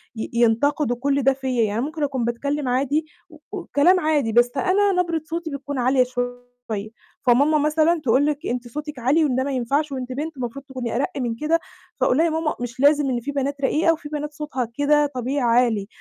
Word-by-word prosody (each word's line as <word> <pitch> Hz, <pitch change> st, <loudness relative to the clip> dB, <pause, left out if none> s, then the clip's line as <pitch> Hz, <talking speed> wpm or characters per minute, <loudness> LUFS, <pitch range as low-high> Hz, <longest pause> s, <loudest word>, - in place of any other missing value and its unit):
ي 220 Hz, -, -4 dB
ينتقدوا 240 Hz, +3 st, +2 dB
كُلّ 280 Hz, +1 st, +1 dB
ده 270 Hz, -, +4 dB
فيَّ. 260 Hz, -3 st, -1 dB
يعني 215 Hz, +2 st, -1 dB
ممكن 305 Hz, +2 st, -3 dB
أكون 265 Hz, -4 st, -1 dB
باتكلّم 280 Hz, +4 st, -2 dB
عادي، 280 Hz, +5 st, +1 dB, 0.2 s
و 310 Hz, -, -15 dB
وكلام 355 Hz, +6 st, +2 dB
عادي، 295 Hz, -8 st, +1 dB
بس 240 Hz, +1 st, +4 dB
أنا 395 Hz, +7 st, +2 dB
نبرة 335 Hz, -3 st, -2 dB
صوتي 330 Hz, +1 st, -4 dB
بتكون 280 Hz, 0 st, -5 dB
عالية 255 Hz, +1 st, +3 dB
شوية، 245 Hz, 0 st, -3 dB, 0.9 s
فماما 285 Hz, +6 st, +4 dB
مثلًا 310 Hz, +2 st, +2 dB
تقول 260 Hz, +3 st, +3 dB
لِك: 300 Hz, +3 st, -2 dB
"أنتِ 245 Hz, 0 st, -3 dB
صوتِك 300 Hz, +2 st, -6 dB
عالي، 290 Hz, +7 st, +3 dB
وده 260 Hz, -2 st, +1 dB
ما 280 Hz, -, -2 dB
ينفعش، 275 Hz, +4 st, 0 dB
وأنتِ 255 Hz, -1 st, -5 dB
بنت 295 Hz, +3 st, -4 dB
المفروض 255 Hz, +3 st, -5 dB
تكوني 255 Hz, -4 st, -5 dB
أرَقّ 280 Hz, +8 st, 0 dB
من 240 Hz, -3 st, -2 dB
كده." 315 Hz, +6 st, +1 dB, 0.4 s
فأقول 250 Hz, -, +3 dB
لها 325 Hz, -, +4 dB
يا 335 Hz, -, +2 dB
ماما: 320 Hz, -1 st, -1 dB
"مش 245 Hz, +1 st, -6 dB
لازم، 285 Hz, 0 st, +4 dB
إن 245 Hz, -2 st, 0 dB
في 280 Hz, +5 st, -5 dB
بنات 280 Hz, 0 st, -2 dB
رقيقة، 315 Hz, +4 st, +3 dB
وفي 310 Hz, -2 st, -8 dB
بنات 300 Hz, 0 st, -4 dB
صوتها 285 Hz, -5 st, -3 dB
كده 295 Hz, +1 st, +3 dB
طبيعي 255 Hz, +3 st, -1 dB, 0.2 s
عالي. 210 Hz, -4 st, -1 dB
280 Hz, 200 wpm, -22 LUFS, 250-300 Hz, 0.9 s, ده